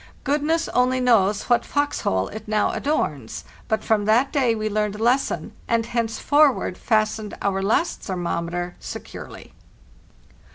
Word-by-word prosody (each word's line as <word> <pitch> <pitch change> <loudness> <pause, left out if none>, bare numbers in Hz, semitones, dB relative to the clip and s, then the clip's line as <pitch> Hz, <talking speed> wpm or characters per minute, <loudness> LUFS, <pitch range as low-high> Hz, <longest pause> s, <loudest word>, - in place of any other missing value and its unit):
Goodness 305 +3 +1
only 255 +1 +2
knows 210 -5 +3
what 240 -1 +2
fox 290 0 -1
hole 95 0 0
it 220 +1 -9
now 215 0 +1
adorns; 300 +2 -2 0.2
but 220 -2 0
from 210 -2 +1
that 240 +6 +3
day 255 -5 +2
we 215 0 -2
learned 210 -1 -1
a 215 - -4
les 250 +4 +4
son, - - -5 0.2
and 230 -1 +1
henceforward 240 +2 +2
fastened 215 -1 0
our 195 -1 0
last 220 - 0
thermometer 175 -1 -3
securely. - - -9
220 Hz, 140 wpm, -23 LUFS, 205-255 Hz, 0.2 s, les